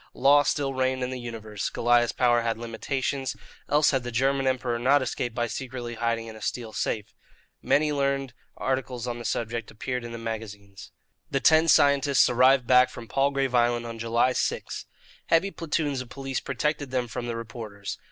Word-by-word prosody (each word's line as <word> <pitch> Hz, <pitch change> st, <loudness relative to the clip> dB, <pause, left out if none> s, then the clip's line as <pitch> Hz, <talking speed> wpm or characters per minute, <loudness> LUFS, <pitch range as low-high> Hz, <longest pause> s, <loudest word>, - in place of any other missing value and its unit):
Law 140 Hz, +2 st, +6 dB
still 140 Hz, -1 st, 0 dB
reigned 130 Hz, 0 st, 0 dB
in 125 Hz, -, -2 dB
the 130 Hz, -, -4 dB
universe. 110 Hz, -4 st, -5 dB
Goliah's 120 Hz, 0 st, +3 dB
power 120 Hz, -1 st, +3 dB
had 115 Hz, -1 st, -1 dB
limitations, 130 Hz, +2 st, -3 dB, 0.3 s
else 150 Hz, 0 st, +4 dB
had 135 Hz, -2 st, +1 dB
the 120 Hz, -, -5 dB
German 135 Hz, +3 st, +1 dB
Emperor 125 Hz, -2 st, 0 dB
not 135 Hz, +3 st, +4 dB
escaped 120 Hz, -2 st, -3 dB
by 120 Hz, -, 0 dB
secretly 120 Hz, -1 st, -5 dB
hiding 115 Hz, 0 st, -1 dB
in 110 Hz, -1 st, -9 dB
a 110 Hz, -, -12 dB
steel 115 Hz, -3 st, -4 dB
safe. 110 Hz, 0 st, -2 dB, 0.5 s
Many 150 Hz, +1 st, +2 dB
learned 140 Hz, -3 st, -1 dB, 0.2 s
articles 130 Hz, -2 st, -2 dB
on 120 Hz, -1 st, -4 dB
the 120 Hz, -, -8 dB
subject 115 Hz, +1 st, -2 dB
appeared 125 Hz, +2 st, -4 dB
in 120 Hz, -, -7 dB
the 115 Hz, -, -6 dB
magazines. 105 Hz, -4 st, -7 dB, 0.4 s
The 135 Hz, -, 0 dB
ten 160 Hz, +3 st, +5 dB
scientists 140 Hz, -2 st, +5 dB
arrived 130 Hz, +1 st, +5 dB
back 125 Hz, +1 st, +5 dB
from 115 Hz, -, -10 dB
Palgrave 135 Hz, +1 st, +1 dB
Island 120 Hz, -1 st, +2 dB
on 115 Hz, -1 st, -7 dB
July 115 Hz, +3 st, +2 dB
6. -, -, -2 dB, 0.4 s
Heavy 170 Hz, +4 st, +3 dB
platoons 150 Hz, -6 st, -2 dB
of 125 Hz, -, -10 dB
police 135 Hz, 0 st, -4 dB
protected 150 Hz, -2 st, -2 dB
them 125 Hz, -1 st, -1 dB
from 120 Hz, +1 st, -5 dB
the 120 Hz, -, -3 dB
reporters. 110 Hz, -3 st, -7 dB
125 Hz, 180 wpm, -26 LUFS, 115-135 Hz, 0.5 s, Law